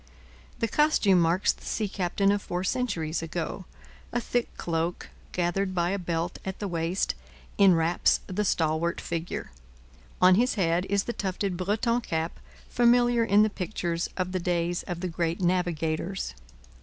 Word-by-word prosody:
The 230 - 0
costume 225 - +4
marks 170 +4 +3
the - - -19
sea 215 - -1
captain 195 +1 +1
of 205 0 0
four 180 -1 -3
centuries 190 -9 -1
ago. 165 +3 -4 0.5
A 240 - 0
thick 245 0 -1
cloak, 165 +1 -2 0.2
gathered 185 +2 -1
by 175 0 +1
a 200 - -1
belt 170 -1 -2
at 190 -1 -4
the 205 - -3
waist, 170 +1 -1 0.5
enwraps 175 -3 +4
the 200 +3 -2
stalwart 165 -2 +1
figure. 165 - -4 0.7
On 185 0 +7
his 240 +7 +3
head 175 -2 +1
is 200 0 +2
the 240 - -3
tufted 195 -2 -2
Breton 215 +6 0
cap 165 -5 -3 0.3
familiar 240 0 +4
in 210 -1 +5
the 215 - +2
pictures 175 -3 -2
of 185 -1 -1
the 185 - -1
days 175 0 0
of 175 -1 -4
the 185 - -1
great 170 0 -1
navigators. 175 0 -1
180 Hz, 155 wpm, -27 LUFS, 170-200 Hz, 0.7 s, On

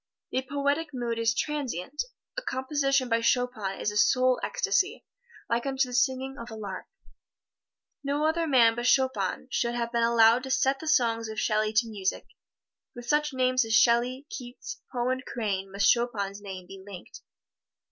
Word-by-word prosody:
The 260 - 0
poetic 285 +3 -1
mood 235 -2 -2
is 230 +1 +2
transient. 285 - -2 0.3
A - - -3
composition 275 - 0
by 230 -1 +1
Chopin 230 -5 0
is 210 - -1
a 210 - -4
soul 255 +4 +3
ecstasy, 395 -1 0 0.4
like 235 +3 -1
unto 270 -1 +1
the - - -8
singing 265 +1 0
of 235 +1 -8
a 220 - -8
lark. 200 -4 -7 1.2
No 285 +2 0
other 325 +1 +1
man 240 -5 +5
but 240 +1 -2
Chopin 260 -6 +1
should 235 0 0
have 235 -1 -2
been 235 -1 +1
allowed 230 +1 +5
to 265 - -7
set 265 +1 +2
the 320 - -8
songs 230 -6 +2
of 220 0 -4
Shelley 215 -1 +1
to 220 +2 +3
music. 200 -4 -3 0.7
With 240 0 -9
such 300 0 +2
names 255 -1 +2
as 225 0 0
Shelley, 245 +5 +3
Keats, 260 - -8
Poe 245 -1 -1
and 260 +1 -1
Crane 195 -6 -3
must 200 +1 +4
Chopin's 205 -5 -1
name 190 -3 -8
be 195 +1 -11
linked. 195 -3 -11
245 Hz, 170 wpm, -27 LUFS, 220-270 Hz, 1.2 s, man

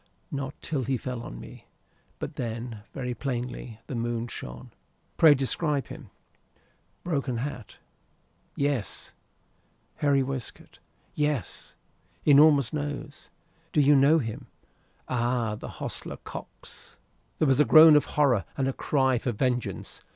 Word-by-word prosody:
"Not 140 0 -5
till 150 -5 -1
he 130 +2 0
fell 125 0 -5
on - - -8
me. - - -12 0.5
But - - -6
then, 115 -2 -5
very 125 -2 -4
plainly. 125 -3 -5
The - - -7
moon 120 0 -2
shone." 60 - -8 0.4
"Pray 155 -3 +7
describe 140 +2 -1
him." - - -10 0.9
"Broken 140 -7 -1
hat." 125 -3 -6 0.8
"Yes." 140 -6 -2 0.8
"Hairy 140 -2 +3
waistcoat." 130 -2 -7 0.3
"Yes." 150 - -2 0.5
"Enormous 145 -3 +6
nose." 145 -1 -5 0.4
"Do - - +3
you 145 0 +6
know 140 +4 +5
him?" 115 -8 -4 0.6
"Ay. 120 -2 0
The - - -7
hostler, - - -5
Cox." - - -11 0.4
There 155 - +2
was 135 0 +3
a - - +7
groan 155 0 +9
of 150 - +4
horror 130 -9 +3
and 135 -1 +1
a 135 - 0
cry 130 -3 +1
for 120 - -2
vengeance. 125 +2 -2
135 Hz, 130 wpm, -27 LUFS, 120-145 Hz, 0.9 s, groan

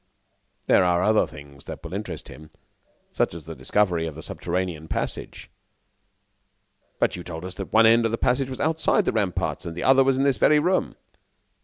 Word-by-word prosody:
"There - - +4
are 90 0 +2
other 110 0 +3
things 70 -2 -13
that - - -8
will - - -8
interest - - -6
him, 75 +1 -12 0.6
such - - 0
as 85 - -8
the 80 - -8
discovery 85 +4 0
of 80 - -7
the 80 - -9
subterranean 90 -3 -3
passage." - - -5 1.5
"But - - +1
you 90 - -7
told 85 0 -7
us 95 - -6
that 95 - -7
one 110 +1 +6
end 115 +1 +5
of 115 - 0
the 115 - -1
passage 130 +3 +1
was 130 - -6
outside 160 +1 +1
the - - +1
ramparts 100 -5 -1
and 85 0 -7
the - - -3
other 135 0 +6
was 135 0 +2
in 135 - +1
this 140 -2 +2
very 150 - +4
room!" 180 +5 +1
95 Hz, 195 wpm, -24 LUFS, 80-125 Hz, 1.5 s, one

